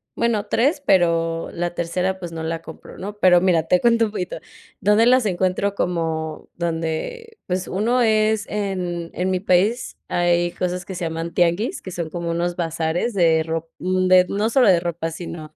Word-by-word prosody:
Bueno, 225 Hz, -3 st, 0 dB
3, 280 Hz, +8 st, +1 dB
pero 165 Hz, -3 st, +2 dB
la 175 Hz, 0 st, -2 dB
tercera, 180 Hz, +3 st, -2 dB
pues, 175 Hz, -2 st, -6 dB
no 160 Hz, -1 st, -5 dB
la 165 Hz, 0 st, -3 dB
compro, 160 Hz, -, -12 dB
¿no?, 205 Hz, +2 st, -7 dB
pero 180 Hz, -3 st, +5 dB
mira, 175 Hz, -4 st, +3 dB
te 180 Hz, +2 st, +2 dB
cuento 230 Hz, -1 st, +4 dB
un 210 Hz, -, -5 dB
poquito, 185 Hz, -4 st, -4 dB, 0.4 s
¿dónde 210 Hz, +3 st, +4 dB
las 255 Hz, -1 st, +4 dB
encuentro?, 190 Hz, +1 st, 0 dB
como 160 Hz, -4 st, -2 dB
donde, 170 Hz, -, -4 dB
pues, 185 Hz, 0 st, -2 dB
1 235 Hz, +6 st, +1 dB
es 215 Hz, -1 st, +2 dB
en 180 Hz, -5 st, -3 dB
en 185 Hz, +1 st, -1 dB
mi 185 Hz, -, 0 dB
país, 200 Hz, +6 st, +1 dB
hay 175 Hz, 0 st, +2 dB
cosas 180 Hz, 0 st, -3 dB
que 190 Hz, -, -7 dB
se 170 Hz, -, -3 dB
llaman 165 Hz, +1 st, -4 dB
tianguis, 175 Hz, -, +1 dB
que 185 Hz, -, -8 dB
son 170 Hz, -2 st, -4 dB
como 170 Hz, 0 st, -4 dB
unos 175 Hz, +1 st, -1 dB
bazares 165 Hz, +6 st, -1 dB
de 165 Hz, -3 st, +4 dB
rop 165 Hz, 0 st, -4 dB
de 185 Hz, 0 st, +4 dB
no 210 Hz, +3 st, 0 dB
solo 250 Hz, -3 st, +4 dB
de 180 Hz, -3 st, +5 dB
ropa, 170 Hz, -1 st, -3 dB
sino 160 Hz, -2 st, -8 dB
180 Hz, 180 wpm, -21 LUFS, 170-205 Hz, 0.4 s, pero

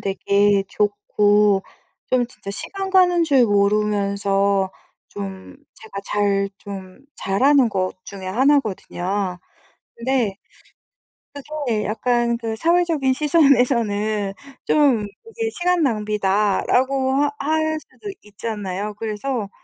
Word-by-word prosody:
되게 200 Hz, 0 st, +2 dB
좋고 205 Hz, -1 st, +2 dB, 0.5 s
좀 250 Hz, -2 st, +2 dB
진짜 215 Hz, -5 st, -10 dB
시간 385 Hz, -, -5 dB
가는 360 Hz, -2 st, +4 dB
줄 275 Hz, -5 st, +4 dB
모르면서 200 Hz, -1 st, +1 dB, 0.4 s
좀 195 Hz, +2 st, -8 dB, 0.2 s
제가 210 Hz, -2 st, -9 dB
잘 200 Hz, -1 st, 0 dB
좀 190 Hz, -1 st, -9 dB, 0.2 s
잘하는 255 Hz, +6 st, +3 dB
것 185 Hz, -3 st, -1 dB
중에 190 Hz, -2 st, -9 dB
1 270 Hz, +9 st, +3 dB
거든요. 190 Hz, -3 st, -4 dB, 0.6 s
근데 235 Hz, -4 st, 0 dB, 1.0 s
그게 285 Hz, -6 st, -3 dB
약간 235 Hz, +2 st, 0 dB
그 225 Hz, -1 st, -4 dB
사회적인 330 Hz, -2 st, +2 dB
시선에서는 240 Hz, -9 st, +2 dB, 0.3 s
좀 280 Hz, -7 st, +3 dB, 0.2 s
이게 455 Hz, 0 st, -3 dB
"시간 360 Hz, -1 st, +1 dB
낭비다."라고 215 Hz, +4 st, +1 dB
하 290 Hz, -, +2 dB
할 315 Hz, +2 st, 0 dB
수도 415 Hz, +6 st, -11 dB
있잖아요. 210 Hz, -1 st, -5 dB
그래서 220 Hz, 0 st, -3 dB
215 Hz, 205 characters per minute, -21 LUFS, 200-275 Hz, 1.0 s, 가는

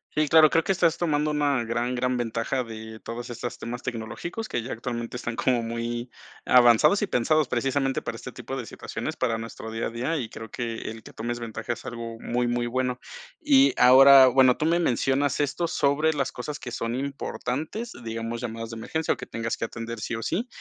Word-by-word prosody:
Sí, 155 Hz, -1 st, +2 dB
claro, 155 Hz, -1 st, +7 dB
creo 165 Hz, -, +2 dB
que -, -, 0 dB
estás 170 Hz, -3 st, +2 dB
tomando 155 Hz, -3 st, +1 dB
una 145 Hz, -4 st, +1 dB
gran, 120 Hz, +2 st, -1 dB
gran 125 Hz, 0 st, 0 dB
ventaja, 120 Hz, +2 st, -1 dB
de 110 Hz, -1 st, -9 dB
todas 120 Hz, +2 st, -6 dB
estas 120 Hz, 0 st, -5 dB
temas 120 Hz, +1 st, -6 dB
tecnológicos, 125 Hz, -, -5 dB
que 120 Hz, -, -2 dB
ya 125 Hz, -, -6 dB
actualmente 120 Hz, 0 st, -4 dB
están 120 Hz, -1 st, -4 dB
como 125 Hz, -1 st, +1 dB
muy 115 Hz, +1 st, -4 dB, 0.4 s
avanzados, 120 Hz, -, +6 dB
y -, -, 0 dB
pensados 150 Hz, +5 st, +2 dB
precisamente 135 Hz, +2 st, 0 dB
para 115 Hz, -, -5 dB
este 125 Hz, +2 st, -8 dB
tipo 130 Hz, +3 st, -7 dB
de 125 Hz, -4 st, -4 dB
situaciones, -, -, -5 dB
para 115 Hz, -3 st, 0 dB
nuestro 115 Hz, 0 st, -7 dB
día 115 Hz, +1 st, -2 dB
a -, -, -4 dB
día, 125 Hz, +8 st, -2 dB
y 120 Hz, -6 st, -4 dB
creo 110 Hz, 0 st, -9 dB
que 115 Hz, 0 st, -4 dB
el, 110 Hz, 0 st, -9 dB
que -, -, -13 dB
tomes 120 Hz, +2 st, -4 dB
ventaja 115 Hz, 0 st, -4 dB
es -, -, -12 dB
algo 115 Hz, -1 st, -6 dB
muy, 120 Hz, +1 st, -1 dB
muy 120 Hz, 0 st, 0 dB
bueno. 125 Hz, 0 st, -1 dB, 0.4 s
Y 280 Hz, -3 st, +5 dB
ahora, 130 Hz, +1 st, +9 dB
bueno, 130 Hz, -1 st, +5 dB
tú 155 Hz, -, -1 dB
me 170 Hz, +2 st, +3 dB
mencionas 135 Hz, -1 st, +1 dB
esto, 150 Hz, +4 st, 0 dB
sobre 150 Hz, +1 st, +2 dB
las 140 Hz, -3 st, -1 dB
cosas 145 Hz, +4 st, -5 dB
que 120 Hz, -, -8 dB
son 115 Hz, -1 st, -3 dB
importantes, 140 Hz, -, -4 dB
digamos 115 Hz, +1 st, -4 dB
llamadas 115 Hz, -1 st, -5 dB
de 115 Hz, -, -6 dB
emergencia, 160 Hz, +8 st, -1 dB
o -, -, -10 dB
que -, -, -7 dB
tengas 115 Hz, 0 st, -3 dB
que -, -, -2 dB
atender 115 Hz, 0 st, -6 dB
sí 115 Hz, -, -3 dB
o 115 Hz, -, -5 dB
sí, 210 Hz, -, -1 dB
125 Hz, 210 wpm, -26 LUFS, 115-140 Hz, 0.4 s, ahora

